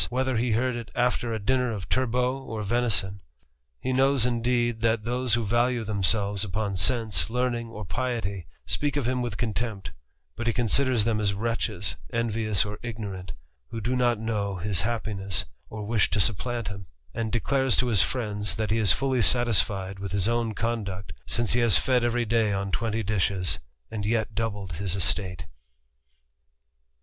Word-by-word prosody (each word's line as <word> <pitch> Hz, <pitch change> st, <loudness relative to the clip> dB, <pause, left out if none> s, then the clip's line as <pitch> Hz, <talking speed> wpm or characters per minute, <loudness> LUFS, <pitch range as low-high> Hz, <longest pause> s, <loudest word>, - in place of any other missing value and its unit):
whether 130 Hz, +1 st, 0 dB
he 115 Hz, 0 st, +1 dB
heard 125 Hz, +2 st, +1 dB
it 120 Hz, -2 st, -6 dB
after 120 Hz, -1 st, +1 dB
a 110 Hz, -, -1 dB
dinner 125 Hz, +4 st, +1 dB
of 100 Hz, -5 st, -5 dB
turbot 125 Hz, +1 st, 0 dB
or 110 Hz, -1 st, -4 dB
venis(HL^ 105 Hz, -3 st, +1 dB, 0.6 s
He 130 Hz, -, -2 dB
knows, 135 Hz, -1 st, +4 dB
indeed, 120 Hz, -1 st, 0 dB
that 115 Hz, -1 st, +1 dB
those 120 Hz, 0 st, +1 dB
who 120 Hz, -2 st, -1 dB
value 120 Hz, +2 st, +1 dB
themselves 100 Hz, -1 st, +1 dB
upocr: 105 Hz, 0 st, -2 dB
sense, 105 Hz, -5 st, +2 dB
learning, 120 Hz, -1 st, -1 dB
or 105 Hz, -2 st, -7 dB
piety, 100 Hz, -3 st, -3 dB, 0.2 s
speak 145 Hz, -, 0 dB
of 135 Hz, -5 st, 0 dB
him 125 Hz, 0 st, 0 dB
¥rith 120 Hz, -4 st, -3 dB
contempt; 110 Hz, -6 st, -3 dB, 0.4 s
bo^a 120 Hz, -, -4 dB
he 115 Hz, -, +2 dB
considers 125 Hz, 0 st, +2 dB
them 115 Hz, -2 st, +1 dB
as 100 Hz, -2 st, +1 dB
wretches, 105 Hz, -5 st, -2 dB
envious 110 Hz, -3 st, +2 dB
or 105 Hz, 0 st, -6 dB
ignorant, 105 Hz, -6 st, -6 dB, 0.4 s
who 115 Hz, -, -5 dB
d^ 120 Hz, +4 st, -1 dB
not 120 Hz, -2 st, +2 dB
know 105 Hz, -3 st, -2 dB
his 90 Hz, 0 st, 0 dB
happiness, 105 Hz, -5 st, -1 dB, 0.2 s
or 105 Hz, -1 st, -6 dB
¥rish 110 Hz, -1 st, +2 dB
to 110 Hz, -, 0 dB
supplant 115 Hz, +2 st, +1 dB
him; 100 Hz, -2 st, -8 dB, 0.3 s
an 115 Hz, 0 st, -2 dB
_ -, -, -6 dB
declares 130 Hz, +1 st, +1 dB
to 125 Hz, -, +2 dB
his 110 Hz, -7 st, +5 dB
friends, 105 Hz, -5 st, -1 dB
that 110 Hz, -2 st, -2 dB
he 110 Hz, -, +2 dB
is 105 Hz, -5 st, +5 dB
fully 130 Hz, -2 st, +2 dB
satisfied 100 Hz, -5 st, +3 dB
with 100 Hz, 0 st, -5 dB
his 100 Hz, 0 st, +2 dB, 0.3 s
conduct, 100 Hz, -6 st, -3 dB
since 120 Hz, -1 st, +1 dB
he 120 Hz, -, +3 dB
has 115 Hz, -7 st, +5 dB
fed 125 Hz, +8 st, +2 dB
every 120 Hz, 0 st, +1 dB
day 110 Hz, -1 st, +2 dB
on 100 Hz, 0 st, -2 dB
twenty 115 Hz, 0 st, -1 dB
dishes^ 95 Hz, -3 st, 0 dB, 0.3 s
yet 110 Hz, +1 st, -1 dB
doubled 105 Hz, -5 st, -3 dB
his 90 Hz, +2 st, -2 dB
estate. 95 Hz, -2 st, 0 dB
110 Hz, 170 wpm, -26 LUFS, 100-120 Hz, 0.6 s, his